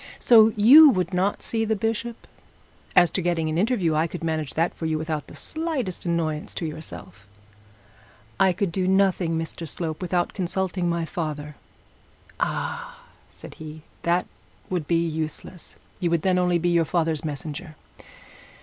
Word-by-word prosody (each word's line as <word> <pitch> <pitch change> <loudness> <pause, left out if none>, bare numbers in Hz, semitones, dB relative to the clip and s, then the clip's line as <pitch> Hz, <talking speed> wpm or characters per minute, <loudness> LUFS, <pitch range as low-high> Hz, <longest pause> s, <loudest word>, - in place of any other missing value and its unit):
So 225 -2 +6
you 275 +9 +9
would 185 -6 0
not 190 +3 0
see 225 -1 -1
the 220 0 0
bishop? 225 +2 -3 0.7
As 175 -2 +6
to 190 - -1
getting 165 -2 0
an 155 - -1
interview, 200 -6 +1
I 155 +2 +2
could 170 +1 -7
manage 160 -3 -2
that 165 +2 +1
for 160 - -4
you 155 -1 0
without 155 -1 -3
the - - -12
slightest 305 - -4
annoyance 160 -3 -2
to 170 - -3
yourself.' 150 - -8 1.1
'I 190 -1 +4
could 185 0 -1
do 185 +1 -1
nothing, 190 -3 +2
Mr 165 +1 -5
Slope, 160 -1 -4
without 180 -1 -1
consulting 185 -1 -1
my 170 -1 -1
father.' 150 -4 -5 0.8
'Ah!' 485 0 -3 0.3
said - - -11
he, 155 0 -9 0.2
'that 175 +1 +1 0.5
would 175 -5 -2
be 170 0 +2
useless; 160 +2 -5 0.2
you 175 - 0
would 165 -2 +1
then 185 -1 +2
only 180 -1 +2
be 175 +1 0
your 170 -1 +3
father's 160 -1 0
messenger. 155 +2 -6
175 Hz, 160 wpm, -24 LUFS, 160-190 Hz, 1.1 s, you